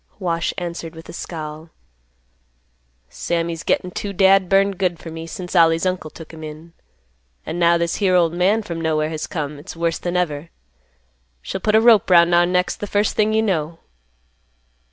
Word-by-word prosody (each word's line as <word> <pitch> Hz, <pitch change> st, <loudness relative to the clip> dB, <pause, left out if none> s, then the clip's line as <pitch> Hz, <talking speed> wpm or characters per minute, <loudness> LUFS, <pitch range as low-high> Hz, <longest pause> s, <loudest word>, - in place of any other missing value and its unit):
Wash 170 Hz, -4 st, -1 dB
answered 170 Hz, -2 st, -5 dB
with 160 Hz, -, -11 dB
a -, -, -8 dB
scowl; 155 Hz, -1 st, -7 dB, 1.4 s
"Sammy's 165 Hz, -, -3 dB
gettin' 180 Hz, -, -1 dB
too 200 Hz, +2 st, -5 dB
dad 190 Hz, -1 st, +4 dB
burned 195 Hz, -1 st, +2 dB
good 180 Hz, -3 st, 0 dB
fer 165 Hz, -, -9 dB
me 165 Hz, 0 st, -7 dB
since 180 Hz, +2 st, -7 dB
Ollie's 165 Hz, 0 st, +4 dB
uncle 185 Hz, -4 st, -2 dB
took 160 Hz, +1 st, -12 dB
him 160 Hz, 0 st, -10 dB
in. 155 Hz, +2 st, -10 dB, 0.7 s
An' 175 Hz, -, -4 dB
now, 170 Hz, 0 st, +4 dB
this 170 Hz, 0 st, -1 dB
here 190 Hz, -3 st, +2 dB
old 170 Hz, -2 st, +3 dB
man 195 Hz, +5 st, +2 dB
from 170 Hz, -5 st, -5 dB
nowhere 155 Hz, -1 st, 0 dB
has 155 Hz, -1 st, -4 dB
come, 150 Hz, -3 st, -4 dB
it's 170 Hz, +6 st, -10 dB
worse 165 Hz, 0 st, -1 dB
than 175 Hz, 0 st, -2 dB
ever. 160 Hz, -2 st, -2 dB, 0.9 s
She'll 185 Hz, -, -5 dB
put 210 Hz, +2 st, +2 dB
a -, -, +7 dB
rope 225 Hz, -4 st, +5 dB
'round 170 Hz, -1 st, +6 dB
our 175 Hz, 0 st, +5 dB
necks 180 Hz, 0 st, 0 dB
th' 205 Hz, -, -7 dB
first 205 Hz, +1 st, +1 dB
thing 215 Hz, 0 st, +2 dB
you 220 Hz, 0 st, +2 dB
know." 165 Hz, -5 st, -1 dB
170 Hz, 180 wpm, -20 LUFS, 165-185 Hz, 1.4 s, a